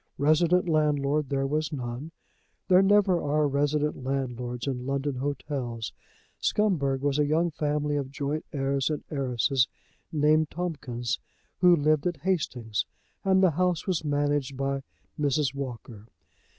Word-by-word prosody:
Resident 170 +5 +3
landlord 150 -2 +1
there 135 -1 0
was 150 +2 -1
none. 125 +1 -5 0.6
There 185 0 +7
never 195 -2 +4
are 150 +1 +2
resident 145 0 0
landlords 125 -2 -3
in 130 -2 -3
London 140 +1 -1
hotels. 130 -4 -3 0.5
Scumberg 145 -11 +1
was 145 0 +1
a 150 - +4
young 165 +3 +2
family 150 -1 -1
of 140 -2 -3
joint 145 +2 -3
heirs 135 0 0
and 150 -2 -3
heiresses, 130 -2 +1 0.4
named 155 0 +3
Tomkins, 140 -9 -3 0.4
who 180 -1 +7
lived 155 0 +2
at 170 -5 -3
Hastings, 125 - -1 0.4
and 190 0 +4
the 185 - +5
house 180 +1 0
was 180 -5 0
managed 145 -2 0
by 135 0 -1 0.4
Mrs. 145 -1 +1
Walker. 120 -5 -7
145 Hz, 135 wpm, -27 LUFS, 135-155 Hz, 0.6 s, There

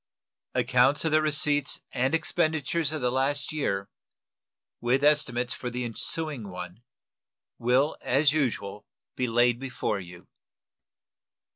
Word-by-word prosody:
Accounts 130 +4 +3
of 160 - +1
the 155 0 +4
receipts 150 -2 +1
and 130 +6 +1
expenditures 160 -1 0
of 155 -2 -3
the 125 0 +1
last 140 +2 0
year, 100 -10 -1 0.9
with 125 +4 +1
estimates 125 -4 +2
for 125 - -5
the 125 +1 -3
ensuing 125 +1 -1
one, 90 +3 -8 0.8
will 130 +5 +2
as 140 +3 +3
usual 105 -9 -2 0.3
be 125 - -1
laid 120 +1 +3
before 130 -6 -2
you. 90 -1 -12
130 Hz, 120 wpm, -27 LUFS, 120-150 Hz, 0.9 s, the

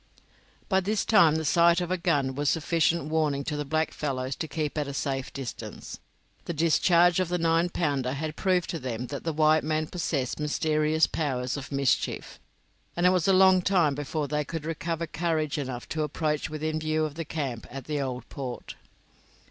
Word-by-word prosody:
By 190 -2 +3
this 205 +3 -1
time 165 -8 +5
the 160 0 -1
sight 170 +2 +4
of 175 0 -3
a - - +3
gun 145 -7 +1
was 145 +1 0
a - - +4
sufficient 165 0 +1
warning 150 -3 +1
to 150 0 -3
the 150 - -2
blackfellows 140 -3 -2
to 160 - -3
keep 155 -2 -3
at 150 -2 -1
a 140 - -5
safe 135 -2 -2
distance; 135 -4 -7 0.5
the 170 - -4
discharge 170 +2 +4
of 185 -2 0
the 180 - 0
nine 165 +1 +2
pounder 140 -7 -1
had 155 +2 -4
proved 185 -1 +1
to 165 - -4
them 125 -2 -4
that 140 - -5
the 165 - 0
white 155 0 +3
man 155 +1 0
possessed 150 -7 -2
mysterious 155 +1 +2
powers 130 -4 -2
of 140 0 -7
mischief, 140 -2 -1 0.6
and 175 - +1
it - - +7
was 180 -2 +1
a - - +5
long 190 -1 +6
time 175 -6 +3
before 145 +1 -3
they 150 +1 -1
could 155 +1 -6
recover 165 +1 -2
courage 155 -2 -1
enough 130 -3 -5
to 155 - -2
approach 150 0 -1
within 155 0 -2
view 155 0 0
of 150 - -5
the 165 +2 -4
camp 140 -7 -4
at 135 -1 -8
the 150 -2 -2
Old 125 -3 -4
Port. 130 -3 -6
155 Hz, 195 wpm, -27 LUFS, 140-165 Hz, 0.6 s, it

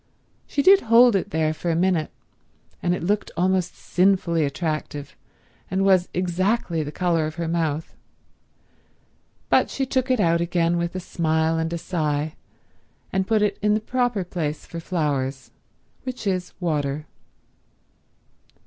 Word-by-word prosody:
She 285 - 0
did 390 +4 +7
hold 235 0 +6
it 195 +1 0
there 155 -3 0
for 170 +2 -4
a 165 - +1
minute, 170 -2 +1 0.7
and 175 0 +1
it 180 - -6
looked 205 +4 0
almost 185 0 +1
sinfully 180 -3 +2
attractive 150 -1 -3 0.5
and 190 +1 +1
was 185 -2 +4
exactly 180 0 0
the 150 -1 -4
colour 165 -2 +1
of 155 - -7
her 170 -1 -3
mouth, 160 -2 -2 1.5
but - - +4
she 270 - -2
took 260 0 -1
it 255 -2 +2
out 170 -3 +3
again 170 0 +1
with 170 +1 -2
a - - -1
smile 160 -2 0
and 160 0 -1
a 170 - -2
sigh 155 -3 -2 0.8
and 190 0 0
put 220 -1 +3
it 205 -1 0
in 210 0 +3
the - - +1
proper 245 -2 0
place 160 -4 -4
for 170 - -7
flowers, 145 -6 -2 0.5
which 255 -3 -6
is 185 -2 -2
water. 150 -4 -1
175 Hz, 150 wpm, -23 LUFS, 160-195 Hz, 1.5 s, did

